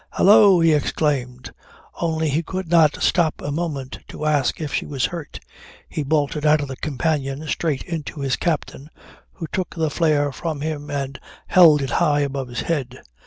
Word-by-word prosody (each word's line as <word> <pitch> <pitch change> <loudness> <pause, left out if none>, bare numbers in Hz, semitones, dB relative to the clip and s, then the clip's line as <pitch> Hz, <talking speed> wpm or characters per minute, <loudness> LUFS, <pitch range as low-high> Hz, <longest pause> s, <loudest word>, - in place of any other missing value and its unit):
"Hallo," 200 -2 +6
he 165 -1 +4
exclaimed; 135 -4 -1 0.5
only 160 -1 0
he 150 +4 0
could 185 +2 -5
not 160 -3 +3
stop 170 -4 +2
a 145 - -4
moment 145 -4 -4
to 155 - -7
ask 145 -4 +1
if 150 -3 -5
she - - 0
was 135 -5 -1
hurt. 155 +4 -6 0.5
He - - -4
bolted 145 0 0
out 155 0 +4
of 145 -1 -4
the 135 - -5
companion 145 0 -2
straight 150 -4 -1
into 160 -3 -6
his 135 -2 0
captain 150 -3 -3 0.4
who 170 - -6
took 185 -2 -3
the 160 -2 -1
flare 150 -3 +1
from 155 +1 -5
him 150 -1 -4
and 140 -2 -4 0.3
held 160 -6 +6
it 135 - -4
high 145 +3 +2
above 135 -2 -3
his 120 -1 -4
head. 130 -6 -3
150 Hz, 175 wpm, -21 LUFS, 140-165 Hz, 0.5 s, Hallo